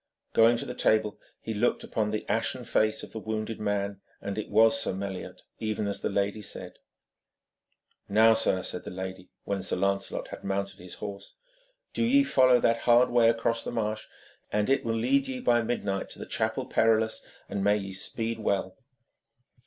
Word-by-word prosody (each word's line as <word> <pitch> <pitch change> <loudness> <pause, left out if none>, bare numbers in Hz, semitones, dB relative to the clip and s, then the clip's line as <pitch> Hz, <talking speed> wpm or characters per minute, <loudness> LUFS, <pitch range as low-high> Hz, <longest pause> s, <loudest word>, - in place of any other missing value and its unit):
Going 115 +1 +5
to - - -3
the - - -5
table, 110 -3 +1 0.2
he 110 - -4
looked 110 +3 +1
upon 110 -2 -1
the 110 0 -3
ashen - - -1
face 110 0 +1
of - - -9
the 110 - -5
wounded 110 0 -4
man, 100 -1 -2 0.2
and 100 -1 -4
it 110 - -4
was 115 +6 +5
Sir 140 - -1
Meliot, 95 -1 -6 0.2
even 110 -1 -2
as 100 - -3
the - - -1
lady 100 +1 -1
said. - - -8 1.3
'Now, 110 +2 +6
sir,' 105 -4 +1
said 90 - -4
the - - -7
lady, 95 0 -7
when 100 -1 -2
Sir 95 - -1
Lancelot 100 +1 -1
had - - -9
mounted 100 0 -3
his 90 0 -10
horse, 100 -1 -8 0.6
'do - - 0
ye 275 +4 +5
follow 130 - +5
that 115 0 +3
hard 120 +1 +6
way 120 -1 +5
across 115 0 0
the - - -4
marsh, 110 -2 -2 0.4
and 105 +4 +1
it 135 - +2
will 115 -1 -1
lead 275 - +2
ye 260 -1 -4
by 120 - +3
midnight 100 -4 -2
to - - -9
the - - -7
Chapel - - -1
Perilous, 110 0 +2 0.2
and 100 - -3
may 105 +1 +4
ye 95 -2 -6
speed 115 +4 -3
well.' 100 0 -1
110 Hz, 185 wpm, -28 LUFS, 100-115 Hz, 1.3 s, Now